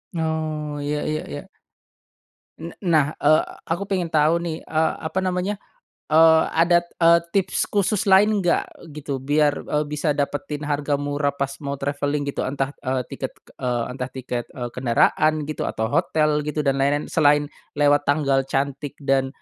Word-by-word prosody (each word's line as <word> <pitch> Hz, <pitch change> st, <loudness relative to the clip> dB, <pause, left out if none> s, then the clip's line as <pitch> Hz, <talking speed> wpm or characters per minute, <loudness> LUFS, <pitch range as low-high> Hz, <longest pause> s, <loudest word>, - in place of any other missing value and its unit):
Oh, 155 Hz, -2 st, -2 dB
ya 145 Hz, +1 st, -2 dB
ya 155 Hz, 0 st, -2 dB
ya. 70 Hz, -, -7 dB, 1.1 s
N 165 Hz, +1 st, -8 dB
nah, 155 Hz, -4 st, +2 dB
eee, 155 Hz, +2 st, +4 dB, 0.2 s
aku 170 Hz, +4 st, -2 dB
pengen 180 Hz, -4 st, -1 dB
tahu 155 Hz, +1 st, +4 dB
nih, 165 Hz, -2 st, -3 dB
eee, 160 Hz, 0 st, +1 dB
apa 160 Hz, +4 st, -2 dB
namanya, 185 Hz, +2 st, -1 dB, 0.5 s
eee, 160 Hz, +1 st, +6 dB
ada, 170 Hz, +1 st, +4 dB, 0.2 s
eee, 170 Hz, 0 st, +5 dB
tips 195 Hz, -2 st, 0 dB
khusus 200 Hz, 0 st, 0 dB
lain 205 Hz, +2 st, +5 dB
nggak, 175 Hz, -2 st, -1 dB
gitu, 140 Hz, -3 st, -4 dB
biar, 145 Hz, +2 st, +2 dB, 0.2 s
eee, 150 Hz, 0 st, +1 dB
bisa 150 Hz, 0 st, -1 dB
dapetin 145 Hz, +1 st, -3 dB
harga 145 Hz, 0 st, 0 dB
murah 145 Hz, 0 st, -1 dB
pas 140 Hz, 0 st, -2 dB
mau 140 Hz, -1 st, -4 dB
traveling, 145 Hz, +1 st, -2 dB
gitu. -, -, -4 dB
Entah, 135 Hz, +1 st, -2 dB
eee, 130 Hz, -1 st, -1 dB
tiket, -, -, -5 dB, 0.3 s
eee, 120 Hz, -2 st, 0 dB
entah 125 Hz, 0 st, -4 dB
tiket, 125 Hz, -2 st, -4 dB
eee, 120 Hz, -2 st, -6 dB
kendaraan, 150 Hz, +5 st, +2 dB
gitu, 155 Hz, +1 st, -3 dB
atau 110 Hz, +1 st, -3 dB
hotel, 150 Hz, -1 st, +2 dB
gitu, 150 Hz, 0 st, -3 dB
dan 135 Hz, -1 st, +1 dB
lain-lain, 145 Hz, +2 st, +1 dB
selain 145 Hz, 0 st, +4 dB, 0.3 s
lewat 145 Hz, 0 st, +3 dB
tanggal 140 Hz, -2 st, +2 dB
cantik 140 Hz, +1 st, -2 dB
dan, 135 Hz, -2 st, +1 dB
150 Hz, 160 wpm, -23 LUFS, 140-160 Hz, 1.1 s, eee